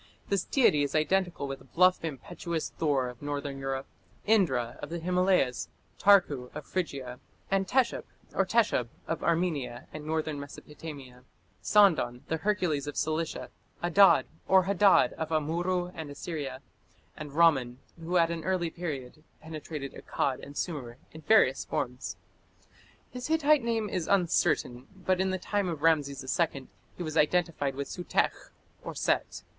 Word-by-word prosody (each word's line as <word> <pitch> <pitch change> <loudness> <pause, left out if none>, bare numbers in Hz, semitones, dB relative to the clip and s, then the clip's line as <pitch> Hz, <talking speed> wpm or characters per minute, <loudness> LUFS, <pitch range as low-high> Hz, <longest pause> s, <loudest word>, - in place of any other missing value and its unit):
This 200 -2 +1
deity 230 - +3
is 140 0 -1
identical 175 -1 +1
with 135 -2 -8
bluff, 185 +1 +4
impetuous 165 +2 -4
Thor 140 -5 0
of 125 -1 -9
northern 145 -1 -4
Europe, 135 0 -3 0.4
Indra 135 - +2
of - - -6
the 170 - -3
Himalayas, 180 -6 +1 0.3
Tarku 165 -11 +4
of - - -6
Phrygia, 135 -9 -4 0.3
and 195 -1 +2
Teshup 255 +2 +1 0.3
or 195 - +3
Teshub 205 - +2 0.2
of 165 - -3
Armenia 160 -8 -1
and 155 - -7
northern 155 -1 -2
Mesopotamia, 140 -3 -10 0.4
Sandan, 170 - +4
the 160 - 0
Hercules 160 -6 0
of 145 - -5
Cilicia, 155 +1 -2 0.3
Adad 190 +3 +6 0.2
or 190 -1 +6
Hadad 200 +1 +4
of 160 -1 -2
Amurru 175 +3 0
and 160 -2 -7
Assyria, 145 -3 -5 0.5
and 150 -2 -8
Ramman, 140 -7 +3 0.2
who 175 +2 0
at 165 -1 +3
an 165 -1 -4
early 180 -3 0
period 155 -4 -6 0.2
penetrated 155 -3 -7
Akkad 130 -2 -2
and 140 +1 -10
Sumer 130 -9 -4
in 160 - -11
various 150 -7 +4
forms. 125 +1 -3 1.0
His 250 0 -5
Hittite 305 -2 +4
name 225 -2 0
is 185 -5 -3
uncertain, 165 -9 +1
but 185 0 0
in 190 - +1
the 185 - -1
time 200 0 -1
of 160 -3 -5
Rameses 140 -4 +2 0.3
II 135 -2 -9 0.3
he 180 - -4
was 155 -2 -5
identified 150 -4 +1
with 140 0 -4
Sutekh 180 - -1 0.5
(Set). - - -1
160 Hz, 145 wpm, -29 LUFS, 140-185 Hz, 1.0 s, Adad